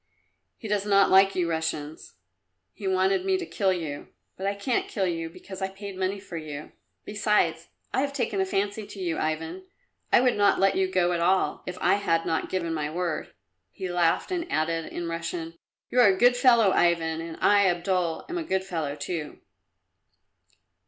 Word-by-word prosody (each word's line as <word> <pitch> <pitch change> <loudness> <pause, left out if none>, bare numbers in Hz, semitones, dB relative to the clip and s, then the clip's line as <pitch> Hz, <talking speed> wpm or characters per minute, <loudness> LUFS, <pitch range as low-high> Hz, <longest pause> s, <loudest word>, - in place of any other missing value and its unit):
He 225 - -8
does 205 -1 0
not 200 -1 +4
like 195 +1 +6
you 180 -2 +1
Russians. 160 - -4 0.6
He 200 - -6
wanted 190 - +2
me 380 -1 +2
to 365 - -4
kill 195 - 0
you, 160 -6 -4 0.3
but 190 - -4
I 200 - 0
can't 235 +5 -1
kill 195 -3 -1
you 165 -2 -2
because 185 +3 -10
I 190 - 0
paid 195 0 -8
money 190 +2 -2
for 190 -4 -8
you. 150 -2 -7 0.3
Besides, 210 0 +1 0.3
I - - +2
have 280 0 -1
taken 230 -8 -1
a - - +1
fancy 200 +2 -2
to 200 - -10
you, 175 -3 -2
Ivan; 160 - -3 0.5
I - - +7
would 250 0 +3
not 205 -1 +3
let 195 0 +4
you 190 0 +1
go 180 -2 +2
at 170 - -1
all, 185 +3 +1
if 180 0 -5
I - - +4
had 165 -5 0
not 160 - -1
given 170 -3 -2
my 150 -2 -2
word." 170 0 -3 0.4
He 185 -2 -6
laughed 175 - +1
and 350 -1 -3
added 165 +1 -1
in 175 - -4
Russian, 165 0 -5 0.3
"You 250 - +2
are 245 - +8
a 190 -1 +3
good 245 +3 +5
fellow, 235 -5 +5
Ivan, 165 -2 +2
and 165 -1 -7
I, 200 -1 +4
Abdul, 175 -1 0
am 355 -1 -3
a - - -3
good 190 -11 -1
fellow 160 -6 -3
too." 155 0 -5
185 Hz, 195 wpm, -26 LUFS, 165-200 Hz, 0.6 s, are